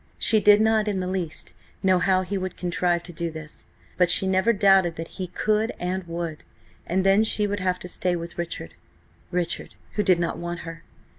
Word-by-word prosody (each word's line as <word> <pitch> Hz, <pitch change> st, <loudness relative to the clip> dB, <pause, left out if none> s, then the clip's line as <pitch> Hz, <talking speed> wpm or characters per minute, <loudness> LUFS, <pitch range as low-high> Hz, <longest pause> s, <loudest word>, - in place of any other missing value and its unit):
She 220 Hz, -, +4 dB
did 210 Hz, 0 st, +6 dB
not 220 Hz, -1 st, +3 dB
in 200 Hz, -2 st, 0 dB
the 185 Hz, -, -2 dB
least 180 Hz, -4 st, -3 dB, 0.3 s
know 185 Hz, -1 st, +4 dB
how 185 Hz, +1 st, +2 dB
he 195 Hz, +2 st, -4 dB
would 185 Hz, -1 st, -4 dB
contrive 175 Hz, -1 st, 0 dB
to 175 Hz, -, -10 dB
do 170 Hz, +1 st, -3 dB
this, 155 Hz, -1 st, -9 dB, 0.3 s
but 180 Hz, -1 st, +4 dB
she 180 Hz, -, +3 dB
never 190 Hz, +4 st, +3 dB
doubted 195 Hz, -5 st, +4 dB
that 165 Hz, 0 st, -6 dB
he 185 Hz, -, -5 dB
could 215 Hz, +4 st, 0 dB
and 185 Hz, +1 st, -2 dB
would. 170 Hz, -2 st, -5 dB, 0.4 s
And 190 Hz, +2 st, 0 dB
then 195 Hz, +2 st, +5 dB
she 215 Hz, -1 st, +1 dB
would 205 Hz, 0 st, -2 dB
have 185 Hz, -1 st, 0 dB
to 180 Hz, -, -7 dB
stay 180 Hz, 0 st, 0 dB
with 170 Hz, 0 st, -6 dB
Richard–Richard, 170 Hz, -, -5 dB, 0.2 s
who 210 Hz, -, 0 dB
did 185 Hz, -3 st, +4 dB
not 170 Hz, -1 st, -2 dB
want 175 Hz, 0 st, -5 dB
her. 165 Hz, 0 st, -8 dB
185 Hz, 200 wpm, -25 LUFS, 170-195 Hz, 0.4 s, did